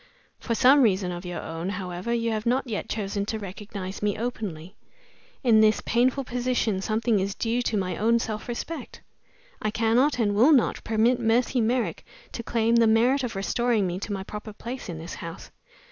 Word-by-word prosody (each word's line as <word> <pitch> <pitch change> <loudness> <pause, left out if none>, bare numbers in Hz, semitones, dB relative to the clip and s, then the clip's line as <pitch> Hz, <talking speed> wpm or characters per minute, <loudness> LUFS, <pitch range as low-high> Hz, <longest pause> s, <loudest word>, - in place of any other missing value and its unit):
For 230 - -2
some 270 +4 +6
reason 190 -6 +2
of 175 +1 -6
your 175 - -4
own, 165 +3 -4
however, 185 +2 -4
you 230 -1 0
have 215 +1 -2
not 255 +3 +2
yet 220 -5 -4
chosen 200 -1 -2
to 220 - -2
recognize 195 -1 -7
me 205 0 0
openly. 205 -7 -5 0.7
In 225 -4 +5
this 215 0 +4
painful 255 +4 +2
position 245 -5 -1
something 220 +1 +1
is 195 +1 -2
due 235 +1 0
to 225 -3 -1
my 185 -2 -1
own 230 +2 +3
self 215 -2 -4
respect. 250 +7 -6 0.6
I 215 - 0
cannot, 230 +6 +2
and 210 -4 +1
will 245 +10 +6
not, 255 -6 +2
permit 225 +3 +2
Mercy 240 +2 +2
Merrick 235 +2 0 0.3
to - - -5
claim 230 0 +1
the 230 -1 +5
merit 245 +5 +3
of 235 -4 -3
restoring 225 +2 +1
me 180 0 -2
to 205 - -5
my 195 -1 -3
proper 210 +2 -8
place 240 +2 -7
in 170 - -5
this 165 +2 -7
house. 165 -2 -8
220 Hz, 190 wpm, -26 LUFS, 200-240 Hz, 0.7 s, some